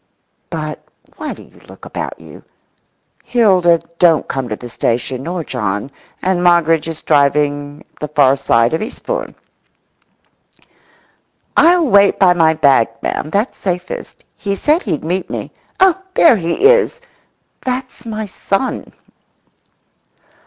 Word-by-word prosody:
(But - - -5 0.3
why - - -5
do - - -14
you - - -20
look - - -13
about - - -6
you? - - -14 0.8
Hilda 185 -8 +3 0.2
don't 165 -3 +4
come 130 -2 -3
to 105 - -2
the 120 - -10
station, 120 +2 -2
nor 170 +3 -4
John; 105 -1 -3 0.3
and 185 -1 +1
Moggridge 165 -2 +3
is 165 -1 -6
driving 145 0 +1
at - - -27
the 150 - -3
far 140 -2 +3
side 115 -2 +2
of 160 - -1 2.7
Eastbourne)."I'll 345 0 +5
wait 200 -4 +4
by 185 -2 +5
my 160 -2 +3
bag, 140 -7 +4 0.2
ma'am, 155 - -2
that's 205 +9 -1
safest. 180 -1 -5
He 200 -1 -3
said 305 - +2
he'd 165 - -3
meet 180 +3 -2
me.… - - -5 0.3
Oh, 380 -1 +4
there 295 -9 +6
he 170 - -1
is! 485 +2 +4 0.6
That's 255 -1 -4
my 220 -2 -4
son." 200 +4 -3
170 Hz, 130 wpm, -16 LUFS, 145-210 Hz, 2.7 s, there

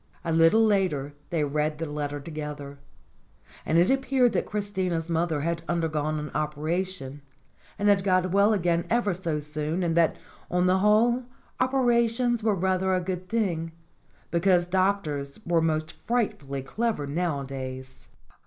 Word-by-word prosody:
A 165 - -1
little 165 +8 +5
later 180 -9 +1 0.2
they 165 -3 0
read 150 +1 -1
the 165 - -3
letter 145 -1 -4
together. 145 -2 -7 0.9
And 160 - +2
it 175 +6 +4
appeared 265 -3 +2
that - - 0
Christina's 190 -5 -2
mother 165 -2 0
had 170 +2 -1
undergone 155 -3 0
an 150 0 -5
operation, 155 -1 -3 0.6
and 205 - 0
had 200 -2 +4
got 185 -2 +2
well 200 +3 +4
again 175 -4 +1
ever 230 -4 +2
so 170 -4 -2
soon; 150 +4 -3
and 165 -1 0
that, 170 -1 +3 0.3
on 180 0 +1
the 185 +1 +3
whole, 230 +5 +3 0.3
operations 240 -2 +2
were 215 -2 +2
rather 190 0 +1
a - - +2
good 180 0 -4
thing, 170 -8 -1 0.6
because 175 0 +3
doctors 180 -6 -1
were 170 -1 +2
most 155 0 0 0.2
frightfully 150 - -1
clever 220 - -2
nowadays. 135 -4 -4
170 Hz, 145 wpm, -26 LUFS, 150-200 Hz, 0.9 s, little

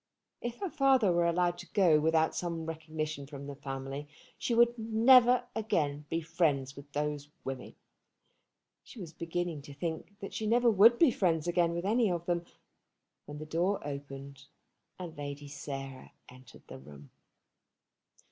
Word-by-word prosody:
If 240 0 -4
her 390 - -1
father 265 -8 +4
were 170 0 +2
allowed 175 +1 +1
to - - -10
go 175 -7 +5
without 160 +1 +2
some 170 -2 -3
recognition 155 -3 -5
from 140 -1 -8
the 140 - -6
family, 135 +1 -6 0.3
she 235 - -1
would 235 0 +5
never 240 +3 +5
again 150 -10 -1
be 165 - -1
friends 145 -5 0
with 140 0 -12
those 145 0 -3
women. 135 -1 -6 1.1
She 245 - -13
was 170 -4 -8
beginning 170 -1 -3
to 140 0 -12
think 165 +6 -5
that 195 - -7
she 215 - -3
never 235 +1 +4
would 225 +4 +7
be 315 -2 +5
friends 170 -6 +1
again 170 -1 +2
with 170 +2 -3
any 225 +1 +3
of 170 -1 -3
them, 175 -1 -1 0.8
when 145 - -7
the 155 - -7
door 175 +6 0
opened, 140 -1 -8 0.5
and 175 -3 -7
Lady 145 0 -6
Sarah 135 -1 -7 0.2
entered 130 0 -15
the - - -9
room. 70 +1 -14
165 Hz, 155 wpm, -31 LUFS, 145-195 Hz, 1.1 s, would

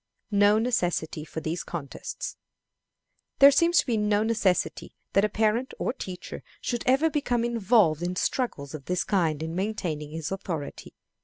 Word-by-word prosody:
No 205 +1 +5
Necessity 175 -9 0
for 160 +1 -6
these 165 +3 -3
Contests. 155 -6 -6 1.0
There 280 +1 +9
seems 335 +5 +3
to - - +5
be 240 -5 0
no 210 0 +2
necessity 215 -5 0 0.2
that 195 - +4
a 210 - +2
parent 220 +4 0
or - - -1
teacher 185 -8 -7 0.2
should 240 -2 -2
ever 270 +5 +4
become 245 -6 0
involved 215 -8 +3
in 175 +1 -2
struggles 170 - -2
of 145 -3 -8
this 180 0 0
kind 160 -6 0
in 160 0 -4
maintaining 175 -6 -3
his 160 +2 -5
authority. 175 -6 -5
200 Hz, 155 wpm, -27 LUFS, 165-235 Hz, 1.0 s, There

